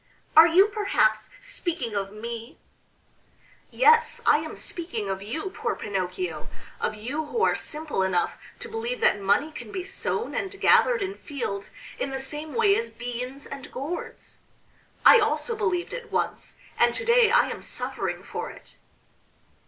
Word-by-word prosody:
"Are 320 Hz, +2 st, +10 dB
you 360 Hz, +4 st, +6 dB
perhaps 220 Hz, -, +1 dB
speaking 345 Hz, -, -3 dB
of 195 Hz, -1 st, -2 dB
me?" 230 Hz, +5 st, -7 dB, 1.1 s
"Yes, 465 Hz, -1 st, +4 dB
I -, -, +6 dB
am -, -, -6 dB
speaking 235 Hz, -, -4 dB
of 190 Hz, 0 st, -4 dB
you, 310 Hz, -, -4 dB
poor -, -, -2 dB
Pinocchio 180 Hz, -5 st, -3 dB, 0.3 s
of 215 Hz, -, -1 dB
you 255 Hz, +9 st, -3 dB
who 460 Hz, +5 st, -1 dB
are -, -, +4 dB
simple 305 Hz, -9 st, -3 dB
enough 185 Hz, -2 st, +1 dB, 0.3 s
to 480 Hz, -, -5 dB
believe 460 Hz, +2 st, -3 dB
that -, -, +4 dB
money 205 Hz, +11 st, +2 dB
can 240 Hz, -8 st, -9 dB
be 370 Hz, -, -3 dB
sown 390 Hz, +4 st, -2 dB
and 395 Hz, 0 st, -4 dB
gathered 480 Hz, -4 st, +5 dB
in 390 Hz, 0 st, -3 dB
fields 230 Hz, -, -5 dB, 0.3 s
in 275 Hz, -, -1 dB
the 270 Hz, -, -3 dB
same 295 Hz, +3 st, -5 dB
way 415 Hz, -3 st, +4 dB
as 230 Hz, -, -1 dB
beans 245 Hz, +4 st, -6 dB
and 275 Hz, -1 st, -8 dB
gourds. 295 Hz, +7 st, -6 dB, 0.7 s
I 465 Hz, -, +10 dB
also 450 Hz, +2 st, 0 dB
believed 385 Hz, -5 st, -1 dB
it 475 Hz, -2 st, -7 dB
once, -, -, -2 dB, 0.2 s
and -, -, +4 dB
to -, -, -2 dB
day 470 Hz, -1 st, +5 dB
I 485 Hz, +2 st, +4 dB
am -, -, -6 dB
suffering -, -, -3 dB
for -, -, -5 dB
it. -, -, -14 dB
300 Hz, 160 wpm, -26 LUFS, -, 1.1 s, Are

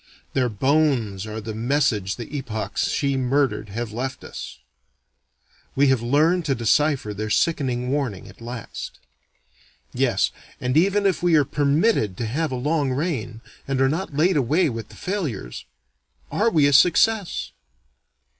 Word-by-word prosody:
Their 125 Hz, -2 st, +1 dB
bones 120 Hz, -4 st, +1 dB
are 110 Hz, +1 st, -5 dB
the 110 Hz, 0 st, -6 dB
message 115 Hz, -5 st, 0 dB
the 120 Hz, +5 st, -8 dB
epochs 115 Hz, -6 st, -2 dB
she 140 Hz, -1 st, 0 dB
murdered 130 Hz, -4 st, 0 dB
have 115 Hz, +2 st, -4 dB
left 130 Hz, +3 st, -4 dB
us: -, -, -8 dB, 1.2 s
we 140 Hz, 0 st, +4 dB
have 130 Hz, -3 st, +2 dB
learned 155 Hz, +9 st, +2 dB
to 135 Hz, -, +1 dB
decipher 130 Hz, 0 st, +1 dB
their 110 Hz, +2 st, -4 dB
sickening 125 Hz, -2 st, 0 dB
warning 135 Hz, -9 st, -2 dB
at -, -, -15 dB
last. 120 Hz, -1 st, -7 dB, 1.0 s
Yes, -, -, +1 dB, 0.3 s
and 125 Hz, +1 st, -1 dB
even 200 Hz, +5 st, +3 dB
if 185 Hz, -5 st, +2 dB
we 175 Hz, -2 st, +3 dB
are 150 Hz, -2 st, +4 dB
permitted 145 Hz, -, +1 dB
to 120 Hz, -, -2 dB
have 145 Hz, +7 st, -1 dB
a -, -, -2 dB
long 145 Hz, +2 st, 0 dB
reign, 130 Hz, -6 st, -3 dB, 0.3 s
and 135 Hz, -1 st, -1 dB
are 135 Hz, -, +4 dB
not 165 Hz, 0 st, -3 dB
laid 165 Hz, +3 st, +3 dB
away 145 Hz, +6 st, +2 dB
with 115 Hz, -2 st, -6 dB
the -, -, -14 dB
failures, 150 Hz, -, -4 dB, 0.7 s
are 225 Hz, +3 st, +2 dB
we 155 Hz, -9 st, +3 dB
a 145 Hz, -, +3 dB
success? 195 Hz, +6 st, +3 dB
135 Hz, 150 wpm, -23 LUFS, 115-155 Hz, 1.2 s, we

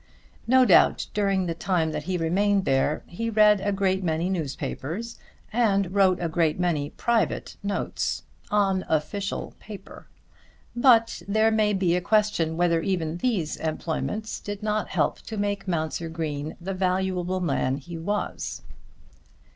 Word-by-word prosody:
No 255 Hz, +1 st, +6 dB
doubt -, -, +5 dB
during 195 Hz, -2 st, +1 dB
the 170 Hz, -, -1 dB
time 165 Hz, -2 st, 0 dB
that 150 Hz, -, -4 dB
he 185 Hz, 0 st, -1 dB
remained 195 Hz, +4 st, +1 dB
there 135 Hz, +3 st, +1 dB
he 230 Hz, +6 st, -4 dB
read 210 Hz, -2 st, +5 dB
a 205 Hz, -, 0 dB
great 190 Hz, -1 st, 0 dB
many 165 Hz, +2 st, 0 dB
newspapers, 160 Hz, -, -4 dB, 0.3 s
and 200 Hz, -5 st, +2 dB
wrote 190 Hz, -2 st, +4 dB
a 170 Hz, -, -1 dB
great 165 Hz, 0 st, +1 dB
many 160 Hz, -5 st, 0 dB
private 235 Hz, +5 st, -1 dB
notes, 200 Hz, 0 st, -2 dB, 0.3 s
on 195 Hz, -2 st, +2 dB
official 195 Hz, +6 st, -2 dB
paper! 210 Hz, -2 st, -11 dB, 0.7 s
But 240 Hz, -2 st, +4 dB
there 220 Hz, +2 st, +3 dB
may 215 Hz, -1 st, +2 dB
be 185 Hz, -3 st, +2 dB
a 180 Hz, -, 0 dB
question 190 Hz, -5 st, +1 dB
whether 170 Hz, -1 st, +2 dB
even 170 Hz, -3 st, -1 dB
these 180 Hz, -7 st, -1 dB
employments 165 Hz, +7 st, -3 dB
did 205 Hz, 0 st, -6 dB
not 215 Hz, 0 st, 0 dB
help -, -, 0 dB
to 220 Hz, -, -7 dB
make 205 Hz, -1 st, -2 dB
Mounser 165 Hz, -1 st, -2 dB
Green 155 Hz, -2 st, -4 dB
the 190 Hz, +3 st, -4 dB
valuable 185 Hz, -1 st, 0 dB
man 135 Hz, -6 st, 0 dB
he 165 Hz, +5 st, -9 dB
was. 205 Hz, +5 st, -3 dB
185 Hz, 145 wpm, -25 LUFS, 165-205 Hz, 0.7 s, No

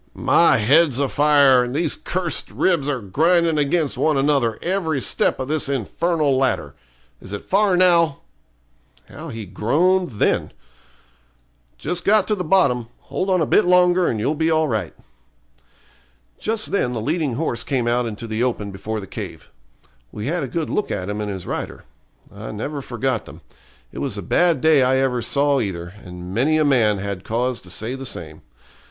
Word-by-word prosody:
'My 170 Hz, -6 st, +4 dB
head's 140 Hz, +5 st, +4 dB
a 140 Hz, -, +1 dB
fire, 140 Hz, -3 st, +4 dB
and 125 Hz, +2 st, -5 dB
these 160 Hz, -1 st, 0 dB
cursed 180 Hz, -1 st, -2 dB
ribs 165 Hz, -7 st, 0 dB
are 135 Hz, -4 st, -2 dB
grinding 165 Hz, -, +2 dB
against 150 Hz, +1 st, 0 dB
one 155 Hz, -2 st, +2 dB
another 135 Hz, -5 st, +1 dB
every 170 Hz, -5 st, -1 dB
step -, -, +1 dB
of 130 Hz, -, -3 dB
this 150 Hz, -1 st, 0 dB
infernal 145 Hz, -, 0 dB
ladder. 130 Hz, 0 st, 0 dB, 0.5 s
Is 95 Hz, -, -10 dB
it 100 Hz, -, -5 dB
far 195 Hz, -1 st, +2 dB
now?' 170 Hz, -5 st, +3 dB, 0.9 s
How 160 Hz, +3 st, -9 dB
he 115 Hz, -4 st, -6 dB
groaned 150 Hz, -, +1 dB
then! 105 Hz, -, 0 dB, 1.2 s
'Just 180 Hz, 0 st, -4 dB
got 210 Hz, -1 st, +4 dB
the 215 Hz, -, 0 dB
bottom; 140 Hz, -10 st, +2 dB, 0.2 s
hold 190 Hz, -, -1 dB
on 185 Hz, -2 st, +2 dB
a -, -, +2 dB
bit 210 Hz, -, +4 dB
longer 180 Hz, 0 st, +4 dB
and 110 Hz, -, -1 dB
you'll 140 Hz, +8 st, 0 dB
be 160 Hz, +1 st, 0 dB
all 160 Hz, -1 st, +2 dB
right.' 110 Hz, -, -3 dB, 1.4 s
Just 220 Hz, 0 st, -2 dB
then 125 Hz, -11 st, 0 dB
the 115 Hz, -, -3 dB
leading 145 Hz, +1 st, -1 dB
horse 120 Hz, -5 st, -2 dB
came 125 Hz, -4 st, -1 dB
out 120 Hz, 0 st, +1 dB
into 110 Hz, +1 st, -6 dB
the 110 Hz, 0 st, -3 dB
open 110 Hz, -5 st, -2 dB
before 105 Hz, +3 st, -5 dB
the 100 Hz, -, -7 dB
cave. -, -, -8 dB, 0.6 s
We 105 Hz, -, -6 dB
had 170 Hz, +5 st, -1 dB
a 135 Hz, -, -3 dB
good 160 Hz, +4 st, -3 dB
look 210 Hz, -, -1 dB
at 90 Hz, +2 st, -3 dB
him 105 Hz, +1 st, -3 dB
and 105 Hz, -, -3 dB
his 95 Hz, -3 st, -6 dB
rider. -, -, -5 dB, 0.5 s
I 105 Hz, +2 st, -8 dB
never 140 Hz, +7 st, -5 dB
forgot 130 Hz, +1 st, -2 dB
them. -, -, -13 dB, 0.5 s
It -, -, -8 dB
was -, -, -3 dB
a -, -, -5 dB
bad 170 Hz, -6 st, +2 dB
day 160 Hz, -3 st, +5 dB
I 130 Hz, +1 st, +3 dB
ever 130 Hz, -2 st, 0 dB
saw 140 Hz, +3 st, +1 dB
either, 90 Hz, -5 st, -4 dB
and 90 Hz, 0 st, -9 dB
many 140 Hz, +9 st, +2 dB
a 155 Hz, -, +2 dB
man 115 Hz, -7 st, +3 dB
had 100 Hz, -1 st, -5 dB
cause 125 Hz, +2 st, -2 dB
to 90 Hz, -, -13 dB
say 110 Hz, +7 st, -3 dB
the 135 Hz, 0 st, -6 dB
same. 80 Hz, -7 st, -7 dB
135 Hz, 180 wpm, -21 LUFS, 115-165 Hz, 1.4 s, day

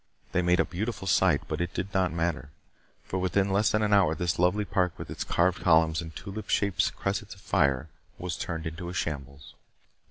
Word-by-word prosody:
They 90 Hz, -, +2 dB
made 90 Hz, +1 st, +3 dB
a -, -, +4 dB
beautiful 100 Hz, +1 st, -4 dB
sight, 90 Hz, -5 st, +3 dB
but -, -, -3 dB
it 85 Hz, 0 st, -3 dB
did 95 Hz, +2 st, -3 dB
not 95 Hz, -3 st, +2 dB
matter. 80 Hz, -5 st, -2 dB, 0.5 s
For 95 Hz, -, -3 dB
within 95 Hz, +2 st, +1 dB
less 100 Hz, +2 st, +3 dB
than 110 Hz, 0 st, +1 dB
an 105 Hz, -1 st, +2 dB
hour 95 Hz, -6 st, +4 dB
this 85 Hz, +1 st, -1 dB
lovely 90 Hz, +4 st, +2 dB
park 90 Hz, -3 st, 0 dB
with -, -, -7 dB
its -, -, -3 dB
carved 90 Hz, +1 st, +1 dB
columns 80 Hz, -1 st, +4 dB
and 80 Hz, -1 st, -9 dB
tulip 105 Hz, +2 st, -7 dB
shaped 100 Hz, -3 st, +1 dB
cressets -, -, -3 dB
of -, -, -18 dB
fire 70 Hz, +2 st, +1 dB, 0.3 s
was 90 Hz, -2 st, -4 dB
turned 80 Hz, -1 st, -4 dB
into 85 Hz, +2 st, -5 dB
a 90 Hz, -, -6 dB
shambles. 70 Hz, -4 st, -5 dB
90 Hz, 200 wpm, -28 LUFS, 80-95 Hz, 0.5 s, a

